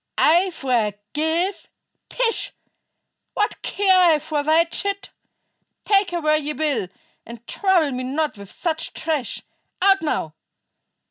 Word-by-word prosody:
"I 350 +4 +4
forgive? 290 - -1 0.4
Pish! 475 -2 -1 0.8
What 420 +1 -1
care 380 -2 +3
I 340 -4 +6
for 300 0 -2
thy 315 +3 +4
chit? 400 +4 -3 0.7
Take 400 -2 +3
her 350 - -2
where 305 -1 +3
ye 300 0 -3
will, 285 -11 -1 0.4
and 235 0 -11
trouble 360 -5 +2
me 255 0 -3
not 290 +3 -1
with 200 -2 -11
such 325 - -3
trash. 310 -6 -2 0.4
Out, 390 +1 +4
now! 165 - -2
315 Hz, 125 wpm, -22 LUFS, 275-370 Hz, 0.8 s, I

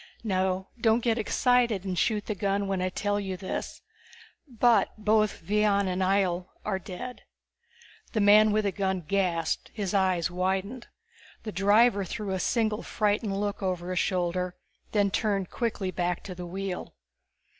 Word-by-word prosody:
Now 190 -2 0
don't 225 +1 +3
get 230 -1 +1
excited 235 -3 +2
and 185 -1 -2
shoot 210 +3 +1
the 215 - -2
gun 200 0 -1
when 195 -1 -1
I 185 - 0
tell 205 +2 -1
you 190 -2 -4
this 185 +1 -5 0.6
but 240 -2 +3
both 215 -2 +1
Vion 205 +1 +2
and 185 0 -1
Ihjel 185 -2 +1 0.2
are 195 -3 -1
dead." 240 +8 -7 0.9
The 220 - +1
man 210 +1 +6
with 215 +1 +2
the 200 - 0
gun 190 -2 -1
gasped, 180 -5 0
his 205 -3 -2
eyes 185 -3 +2
widened. 190 +7 -2 0.6
The 215 - -4
driver 205 +2 +4
threw 195 +2 -4
a 190 - -1
single 220 +1 0
frightened 205 -1 0
look 205 0 -2
over 180 -2 -2
his 185 - 0
shoulder, 180 -1 -1 0.4
then 205 -2 +2
turned 200 -3 0
quickly 215 -5 -2
back 175 -1 -2
to 185 - -7
the 180 0 -7
wheel. 190 0 -5
200 Hz, 155 wpm, -28 LUFS, 185-215 Hz, 0.9 s, man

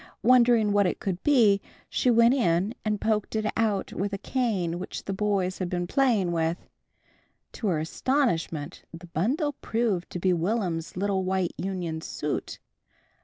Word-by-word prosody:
Wondering 235 -3 +5
what 200 -1 +3
it - - -2
could 185 -2 -3
be, 225 -9 +4 0.3
she 250 - +1
went 235 +1 +5
in 190 -4 +1
and 210 -1 -1
poked 215 0 -1
it 215 0 0
out 215 -4 0
with 200 +2 -2
a - - -1
cane 195 -9 -1
which 185 - -6
the 195 - -2
boys 190 -2 0
had 185 -2 -2
been 175 0 -1
playing 220 -5 +2
with. 165 0 0 0.9
To 220 - -4
her 175 -5 +1 0.3
amazement 175 - 0
the 165 +1 -10
bundle 250 - -1
proved 220 -6 -1
to - - -5
be 185 +1 +2
Will'm's 175 -2 -2
little 195 0 0
white 185 -1 0
union 180 -4 -3
suit. 150 -1 -4
195 Hz, 160 wpm, -27 LUFS, 175-225 Hz, 0.9 s, Wondering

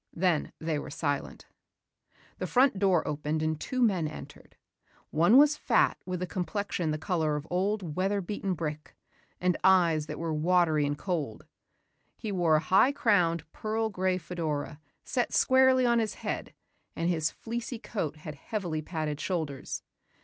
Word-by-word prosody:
Then 170 -3 +1
they 160 -2 -2
were - - -7
silent. 145 -1 -3 0.9
The - - -2
front 255 -5 +3
door 190 -5 +2
opened 150 +1 -2
and 155 -1 -1
two 255 -1 0
men 185 -8 +2
entered. 155 - -11 0.6
One 170 +10 +5
was 295 +1 +6
fat - - +3
with 180 -1 -3
a - - 0
complexion 180 -1 -2
the 155 - -1
color 155 -2 0
of 150 0 -4
old 185 -3 -1
weather 195 +2 +1
beaten 195 0 -3
brick 150 -2 -5 0.4
and 180 -2 +1
eyes 170 -5 +4
that 150 - -5
were 165 -1 -2
watery 160 -2 +2
and 145 0 -2
cold. 155 - -3 0.7
He 215 - -4
wore 175 -5 +3
a - - +4
high 190 - +4
crowned, 180 - +2
pearl 220 +1 -2
grey 185 -1 0
fedora, 160 -4 -4 0.2
set 245 - -1
squarely 260 -1 +5
on 235 -1 +3
his 220 -2 -1
head - - -5 0.4
and 165 - -1
his 160 -3 +1
fleecy 235 +1 -5
coat 180 -9 -4
had 155 0 -8
heavily 165 0 -4
padded 155 -2 -3
shoulders. 155 -7 -3
175 Hz, 155 wpm, -29 LUFS, 155-205 Hz, 0.9 s, was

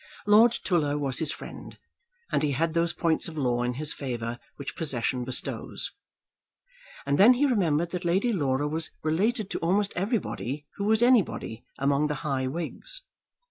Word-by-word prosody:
Lord 220 +3 +6
Tulla 150 -5 +1
was 135 -4 0
his 155 -2 -1
friend, - - -9 0.5
and - - +1
he 150 -2 +1
had 160 +4 0
those 170 0 +1
points 165 -2 0
of 160 -2 -9
law 125 -4 +1
in 125 0 -1
his 150 +2 +3
favour 120 -3 -4 0.2
which 140 - -7
possession 130 -5 0
bestows. 130 +1 -1 1.1
And 140 0 0
then 235 +6 +8
he 280 +4 +2
remembered 170 - +1
that 180 0 -4
Lady 190 +8 +1
Laura 145 -5 0
was 160 +2 -3
related 200 +7 0
to - - -2
almost 195 +4 +1
everybody 175 - -2
who 200 - -2
was 220 +2 +3
anybody 215 - +1
among 140 +2 +1
the 150 - -2
high 135 -3 0
Whigs. - - -1
160 Hz, 165 wpm, -27 LUFS, 140-200 Hz, 1.1 s, then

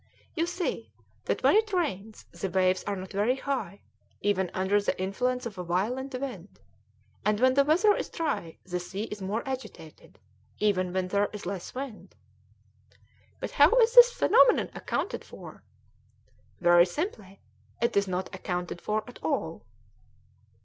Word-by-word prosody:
You 335 0 0
see 355 0 -3 0.3
that - - -2
when - - +5
it 435 0 +3
rains 220 - -2
the 195 - -4
waves 185 0 +2
are 205 - -2
not 185 0 -8
very 210 +5 +1
high, 255 -9 -4 0.4
even 190 -3 0
under 190 +2 +1
the 200 - -2
influence 250 +7 -1
of 210 -5 -6
a - - -3
violent 250 +10 -2
wind, 210 -9 -7 0.6
and 210 0 +1
when 255 +1 +4
the 280 +1 +5
weather 365 +9 +4
is - - -4
dry 285 - -3
the 180 -1 -3
sea 190 +3 -5
is 210 -2 -7
more 210 +7 -3
agitated, 255 - -8 0.4
even 185 -4 +1
when 185 0 -1
there 205 +1 +1
is 210 - -7
less 185 +3 -5
wind." 260 -4 -7 1.2
"But - - -5
how - - +6
is 470 -1 +5
this - - +9
phenomenon 485 - +4
accounted - - -3
for?" - - -12 1.0
"Very 175 0 +6
simply; 200 - -5 0.4
it 235 - 0
is 200 0 +2
not 185 0 -3
accounted 180 -1 -4
for 215 0 -1
at 245 - -12
all." - - -2
205 Hz, 155 wpm, -28 LUFS, 185-265 Hz, 1.2 s, this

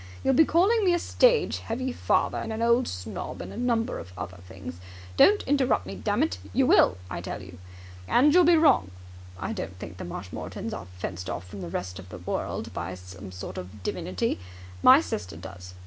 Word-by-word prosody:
You'll 270 - +3
be 320 +5 +6
calling 405 +9 +3
me 360 -2 +4
a - - +2
stage - - +3
heavy 255 +3 -3
father - - +1
and - - -4
an 220 +1 -2
old 235 +2 +3
snob 90 0 -5
and - - -7
a - - -9
number 235 0 0
of 90 - -10
other 90 0 -6
things. 95 -2 -9 0.4
Don't 415 - +6
interrupt 260 - +2
me, 95 - -6
dammit! 90 0 0
You - - +3
will, 90 - +5
I - - -5
tell - - -5
you! - - -12 0.5
And 290 - +5
you'll 360 +1 +7
be 340 0 +6
wrong. 290 - +4 0.5
I - - -3
don't 95 -1 -5
think 90 0 -8
the - - -6
Marshmoretons 90 +1 -6
are 90 - -6
fenced 90 0 -5
off 90 - -4
from 100 +1 -8
the 85 - -5
rest 90 +2 -4
of 95 -1 -11
the 90 - -8
world 90 - -4
by 90 +2 -4
some 90 +1 -10
sort 90 0 -6
of 95 +2 -10
divinity. 90 -1 -2 0.4
My - - +8
sister 90 -2 -5
does. 90 +1 -10
95 Hz, 200 wpm, -27 LUFS, -, 0.5 s, My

